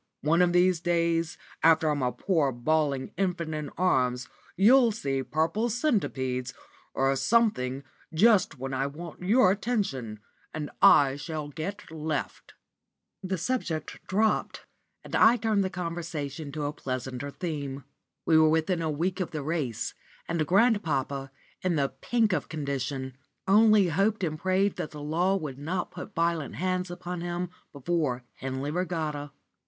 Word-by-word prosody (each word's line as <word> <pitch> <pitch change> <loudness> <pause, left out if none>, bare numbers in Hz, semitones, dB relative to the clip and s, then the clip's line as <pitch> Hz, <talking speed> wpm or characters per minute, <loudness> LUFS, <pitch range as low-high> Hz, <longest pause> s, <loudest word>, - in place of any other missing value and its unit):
One 165 +4 +3
of 175 -1 +4
these 180 0 +3
days, 165 -1 0 0.2
after 160 0 +5
I'm 150 -2 +1
a 125 -1 +1
poor 160 -6 +1
bawling 140 +2 0
infant 175 -4 -1
in 150 -2 -4
arms, 125 -8 +1 0.3
you'll 235 +5 +6
see 135 -11 -2
purple 165 - 0
centipedes 135 - -1 0.4
or 135 +1 +2
something 140 - +1 0.3
just 190 -2 +4
when 135 +1 -5
I 135 +1 0
want 165 +4 -9
your 195 +1 +4
attention, 190 - -2 0.4
and 150 -2 -4
I 140 -1 +6
shall 155 -1 -5
get 160 +5 -6
left." 155 -2 -4 0.7
The 190 0 -2
subject 170 - -3
dropped, 215 +3 0 0.4
and - - -5
I 230 +3 +6
turned 220 -3 +1
the 190 - -1
conversation 165 -5 -5
to 150 0 -3
a 145 - -2
pleasanter 130 0 -4
theme. 140 -4 -5 0.4
We 160 -1 +5
were 155 0 +6
within 160 +2 +1
a 160 - -1
week 175 +6 -1
of 185 - -1
the 155 -3 -5
race, 145 -7 -2 0.3
and 165 -3 -1
grandpapa, 160 - +1 0.3
in 180 -2 0
the 140 -2 +1
pink 230 -4 0
of - - -2
condition, 135 -3 -3 0.3
only 210 -1 +6
hoped 200 +5 +1
and 155 -3 -2
prayed 190 +2 +1
that 155 - -3
the 150 - -9
law 175 +6 +1
would 150 -8 -4
not 175 +5 -3
put - - -9
violent 165 -3 0
hands 185 +1 -1
upon 175 0 -5
him 175 0 -3 0.2
before 140 -3 -1
Henley 135 +2 -3
Regatta. 155 -4 -2
160 Hz, 150 wpm, -28 LUFS, 140-185 Hz, 0.7 s, you'll